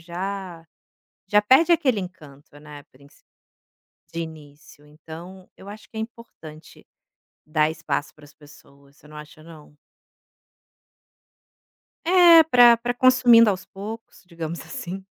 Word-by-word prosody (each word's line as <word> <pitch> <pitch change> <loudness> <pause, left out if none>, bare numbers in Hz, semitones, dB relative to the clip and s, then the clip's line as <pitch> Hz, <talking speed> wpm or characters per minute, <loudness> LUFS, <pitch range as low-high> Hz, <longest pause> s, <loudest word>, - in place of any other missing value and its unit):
já 180 0 -7 0.6
já 210 +2 +2
perde 270 +11 +4
aquele 280 -9 +1
encanto, 145 -6 -12
né, 150 -1 -13
princi 140 +2 -24 0.9
de 165 - -5
início, 150 -2 -12
então 165 +5 -13
eu 195 - -14
acho 215 +1 -13
que - - -21
é 220 - -4
importante 170 -9 -13 0.6
dar 155 0 0
espaço 150 -2 -5
para 155 - -20
as 145 0 -18
pessoas, 140 -1 -21
você 150 - -21
não 150 - -13
acha 150 +1 -14
não? 155 -2 -16 2.3
É, 345 -1 +6
para 245 -5 +5
para 245 +1 -4
consumindo 245 -3 +5
aos 190 -1 -5
poucos, 215 +4 -11
digamos 170 -1 -7
assim. 195 -7 -9
170 Hz, 125 wpm, -22 LUFS, 150-225 Hz, 2.3 s, É